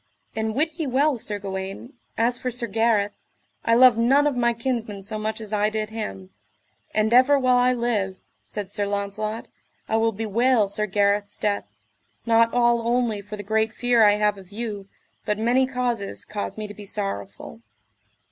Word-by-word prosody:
And 220 0 -2
wit 320 +3 -1
ye 315 - -1
well 270 +1 +2
Sir 210 -1 -2
Gawaine, 195 +4 -6 0.2
as 240 +2 +1
for 255 - -2
Sir 245 -1 -1
Gareth, 220 -2 +1 0.5
I 230 - +3
love 245 -2 +6
none 270 +5 +4
of 290 -3 +1
my 235 -1 +2
kinsmen 230 -4 -3
so 215 +2 -4
much 215 +1 -3
as 215 -1 -7
I 210 0 +2
did 215 0 -3
him; 95 - -6 0.6
and 215 +1 +1
ever 260 +3 +6
while 255 -2 +3
I 250 +1 +4
live, 215 -6 -1 0.2
said 205 -2 -7
Sir 205 -1 -1
Launcelot, 205 +2 -3 0.4
I 220 - +1
will 225 0 +2
bewail 225 +1 +1
Sir 210 +1 -1
Gareth's 200 +1 +1
death, 205 -1 -1 0.6
not 230 0 +4
all 240 -1 +3
only 235 -4 +1
for 205 +1 -8
the 205 - -6
great 220 +2 0
fear 245 -2 +3
I 205 -1 +6
have 210 -1 +1
of 190 0 -16
you, 205 -3 -5 0.3
but 210 - -1
many 245 +4 +2
causes 245 -6 -2
cause 210 0 -5
me 215 - -4
to 205 - -8
be 210 - -11
sorrowful. 110 - -5
220 Hz, 180 wpm, -24 LUFS, 205-240 Hz, 0.6 s, love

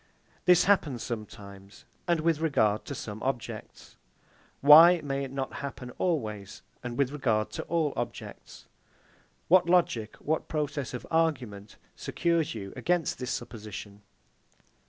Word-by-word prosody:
This 180 -1 +6
happens 155 - +2
sometimes, 100 -3 -8 0.2
and 170 -2 +2
with 165 -1 +1
regard 110 -10 +1
to 140 - -5
some 105 -2 -7
objects: 130 -3 -5 0.6
Why 165 +5 +9
may 140 -1 -2
it 135 - -6
not 135 -1 -4
happen 130 -3 -6
always, 110 - -2 0.2
and 120 -1 -5
with 140 -2 +1
regard 115 -7 0
to - - -5
all 160 -4 0
objects? 120 -1 -7 0.8
What 175 0 +5
logic, 125 -12 +2
what 160 +1 -2
process 145 -4 -3
of 125 - -7
argument 125 -11 -1 0.2
secures 170 -6 -1
you 100 -3 -7
against 175 -2 0
this 125 -1 -4
supposition? 105 -2 -7
135 Hz, 130 wpm, -28 LUFS, 110-160 Hz, 0.8 s, Why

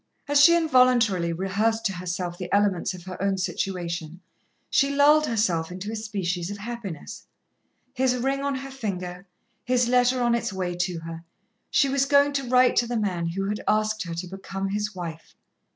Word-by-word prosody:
As 290 0 +4
she 335 +3 +8
involuntarily 250 - +3
rehearsed 205 +6 0
to 195 - +1
herself 180 -1 -4
the 180 - -6
elements 200 -3 +1
of 175 - -11
her 185 0 -8
own 195 -1 +1
situation, 175 -3 -3 0.5
she 280 0 +2
lulled 300 +2 +5
herself 180 -8 0
into 185 +4 -6
a - - -4
species 190 -5 -3
of 205 - -5
happiness. 210 -7 -7 0.7
His 260 -1 +1
ring 270 +2 -1
on 280 -1 -1
her 270 +1 -6
finger, 185 -7 -5 0.4
his 250 -1 +2
letter 250 +1 +3
on 240 0 +3
its 235 -2 -1
way 185 -2 -3
to 175 -1 -2
her 165 0 -8 0.5
she 275 - +3
was 275 0 +1
going 285 0 +4
to 275 -3 -2
write 255 0 +5
to 240 - +3
the 240 0 -2
man 180 -6 -1
who 195 +4 -2
had 210 +1 -2
asked 215 0 +1
her 170 -2 -4
to 175 +2 -5
become 195 +1 -5
his 210 0 -2
wife. 165 -3 -7
205 Hz, 185 wpm, -25 LUFS, 180-250 Hz, 0.7 s, she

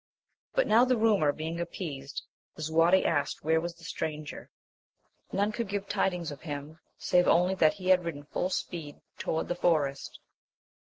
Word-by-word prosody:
But - - +4
now 230 +3 +5
the 255 -1 +3
rumour 210 -10 +3
being 160 +3 -4
appeased, 150 -5 -5 0.3
Lisuarte 165 +4 +3
asked 145 -3 0
where 160 +1 +3
was 170 0 -4
the 170 - -18
stranger? 155 -2 -5 0.8
none 205 +2 +1
could 230 0 -3
give 200 0 -3
tidings 180 -5 0
of 145 - -9
him, 150 0 -6 0.2
save 180 0 +3
only 180 +2 +4
that 160 -5 +4
he 185 -2 -4
had 185 -1 +5
ridden 155 -4 -5
full 180 +5 -2
speed 160 -6 -4 0.2
toward 160 - -1
the - - 0
forest. 150 -6 0
170 Hz, 160 wpm, -29 LUFS, 155-185 Hz, 0.8 s, now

